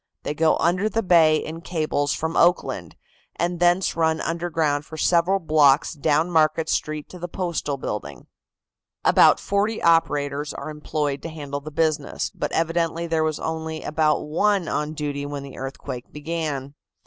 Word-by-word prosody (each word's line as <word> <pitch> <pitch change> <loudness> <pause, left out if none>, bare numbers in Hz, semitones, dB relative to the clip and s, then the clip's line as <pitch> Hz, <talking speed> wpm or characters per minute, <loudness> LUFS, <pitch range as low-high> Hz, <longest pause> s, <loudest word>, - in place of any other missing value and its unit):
They - - -2
go 160 +1 +3
under 180 +5 +1
the 225 +1 -1
bay 165 -4 +5
in 160 +1 -4
cables 155 -4 -1
from 160 +1 -2
Oakland, 175 +2 +1 0.4
and 175 0 -1
thence 175 +2 +3
run 160 -1 +1
underground 165 -4 -1
for 160 +1 -10
several 175 +4 +3
blocks 150 -5 +3
down 155 +3 +1
Market 155 -1 +2
Street 155 -1 -2
to 180 - -10
the 175 - -4
Postal 170 -5 -3
building. 75 - -6 0.8
About - - +6
forty 205 +3 0
operators 145 -3 +1
are 155 - -6
employed 150 -2 -3
to 165 - -6
handle 145 -3 -6
the 155 - -7
business, 155 0 -1
but - - -4
evidently 165 0 0
there 165 -1 0
was 155 -1 -1
only 160 0 -4
about 155 0 +1
one 185 +4 +1
on 150 +1 -2
duty 145 -2 -3
when 145 -1 -5
the 140 -1 -10
earthquake 135 -1 -6
began. 150 -3 -4
155 Hz, 160 wpm, -23 LUFS, 145-170 Hz, 0.8 s, About